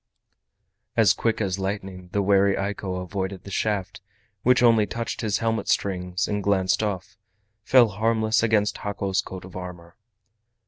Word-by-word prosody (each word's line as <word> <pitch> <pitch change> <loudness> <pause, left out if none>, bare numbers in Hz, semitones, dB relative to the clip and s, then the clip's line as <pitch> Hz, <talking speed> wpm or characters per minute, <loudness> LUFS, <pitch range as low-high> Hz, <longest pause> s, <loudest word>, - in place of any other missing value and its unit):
As 110 -5 +6
quick 115 -1 -1
as 95 -3 -1
lightning 95 -2 -4
the 100 +1 0
wary 100 0 +4
Eiko 100 -1 -3
avoided 95 0 -4
the 100 - -10
shaft, 100 -1 -2 0.4
which 125 +2 +4
only 115 -3 +5
touched 115 -1 -4
his 105 -3 0
helmet 115 -1 -1
strings, 90 -1 0
and 105 -1 -1
glancing 95 +1 +1
off, 95 0 -6 0.4
fell 120 -1 +5
harmless 110 +2 +1
against 110 -2 +1
Hako's 100 -2 -1
coat 95 -1 -9
of 95 - -13
armor. 90 -2 -8
100 Hz, 145 wpm, -24 LUFS, 95-110 Hz, 0.4 s, As